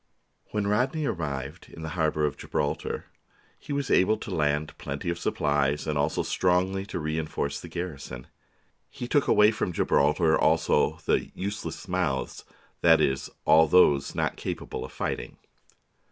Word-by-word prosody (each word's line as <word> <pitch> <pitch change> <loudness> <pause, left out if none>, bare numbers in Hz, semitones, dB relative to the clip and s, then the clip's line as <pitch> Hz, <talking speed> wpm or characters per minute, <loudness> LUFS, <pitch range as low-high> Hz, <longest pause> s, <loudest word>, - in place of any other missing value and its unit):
When 105 -1 -1
Rodney 130 +9 +1
arrived 75 - -4
in 80 - -10
the 80 - -4
harbour 80 -3 +1
of 75 - -1
Gibraltar 70 - -3 0.5
he - - -9
was 140 -2 -1
able 110 +4 +4
to 100 - -6
land 75 -2 0
plenty 70 +5 -3
of 85 - -5
supplies 75 -2 0
and 75 -1 -1
also 75 +2 0
strongly 95 +2 +1
to - - -4
reinforce 75 -2 -2
the - - -9
garrison. 75 -8 -6 0.6
He 120 - -6
took 145 +2 +2
away 105 +1 +6
from 105 -4 -2
Gibraltar 80 0 +3
also 80 -1 +2
the - - +2
" - - -21
useless 100 -1 -5
mouths 90 -8 -2 0.2
"; - - -35
that 80 -1 +6
is, 65 -3 0 0.2
all 80 +1 +6
those 75 -4 +4
not - - -1
capable - - -5
of - - -8
fighting. - - -4
80 Hz, 155 wpm, -27 LUFS, 75-95 Hz, 0.6 s, away